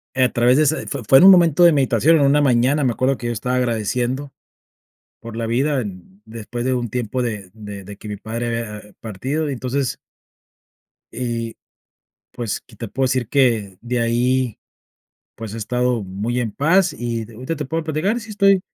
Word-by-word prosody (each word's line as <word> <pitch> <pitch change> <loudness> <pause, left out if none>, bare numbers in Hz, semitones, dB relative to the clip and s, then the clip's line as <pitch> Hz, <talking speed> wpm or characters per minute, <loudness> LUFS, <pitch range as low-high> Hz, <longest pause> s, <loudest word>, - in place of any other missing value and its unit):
a 130 -1 +3
través 120 +2 +3
de 155 - +5
esa 155 +1 0
fue 140 -4 -4
fue 135 - +7
en - - +6
un 195 - +11
momento 175 -3 +5
de 170 -1 +7
meditación, 140 +3 +3
en 145 - +3
una 145 +2 +4
mañana, 135 +2 +3
me 130 - +2
acuerdo 130 +3 +1
que 120 - -5
yo 120 - -1
estaba 125 +3 -2
agradeciendo 125 +3 -1 0.9
por 115 -1 -9
la 115 - -2
vida 135 +5 +1
en 95 -2 -9
después 115 +2 -6
de 130 - +1
un 120 -1 -2
tiempo 125 +1 -2
de 105 -6 -4
de 105 -3 -9
de 100 +2 -9
que 105 - -10
mi 105 - -4
padre 115 +3 -4 0.2
había 105 -1 -10
partido 135 +9 -3
y, - - -2
entonces 130 +1 -2 1.2
Y, 115 -2 -3 0.7
pues, 115 -4 -4
que 120 - -19
te 115 +2 -6
puedo 135 +5 -1
decir 130 -2 0
que, 115 -9 +1
de 120 0 -2
ahí, 120 +1 +1 0.8
pues, 110 -1 -7
he - - -5
estado 125 +1 0
muy 105 +6 -3
en 115 -3 -2
paz 170 - +2
y 115 -2 -3
d 115 - -14
ahorita 130 +8 -4
te 150 - -4
puedo 160 +4 -3
platicar, 160 +9 0
sí 220 -1 -11
estoy 195 -2 +4
125 Hz, 195 wpm, -20 LUFS, 115-140 Hz, 1.2 s, un